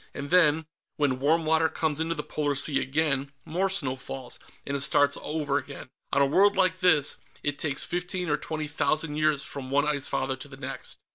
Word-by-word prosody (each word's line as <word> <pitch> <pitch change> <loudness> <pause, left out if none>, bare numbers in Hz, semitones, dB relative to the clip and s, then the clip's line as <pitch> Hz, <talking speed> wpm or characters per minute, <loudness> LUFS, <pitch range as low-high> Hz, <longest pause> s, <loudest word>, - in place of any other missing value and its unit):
And 140 +2 -6
then, 160 -3 +4 0.3
when 140 -4 +1
warm 160 +4 +2
water 160 +1 +3
comes 155 -2 -1
into 165 +1 -1
the 150 - -4
polar 145 -2 -1
sea 140 +1 +2
again, 140 -1 0
more 185 +4 0
snow 140 -9 0
falls, 130 -1 -6 0.3
and 140 - -2
it - - -1
starts 140 +1 +4
over 145 -2 -1
again. 135 -1 -10 0.2
On 140 - +4
a - - +5
world 195 +8 +4
like 185 -2 +2
this, 160 -6 +4 0.3
it 145 -1 -1
takes 145 -3 -1
fifteen 180 +1 -3
or 150 - +2
twenty 155 -1 -4
thousand 150 +1 0
years 155 -2 +2
from 135 -2 -7
one 145 +2 +2
Ice 145 -2 0
Father 130 0 -1
to 130 - -9
the 135 -1 -12
next." - - -5
150 Hz, 205 wpm, -27 LUFS, 140-160 Hz, 0.3 s, a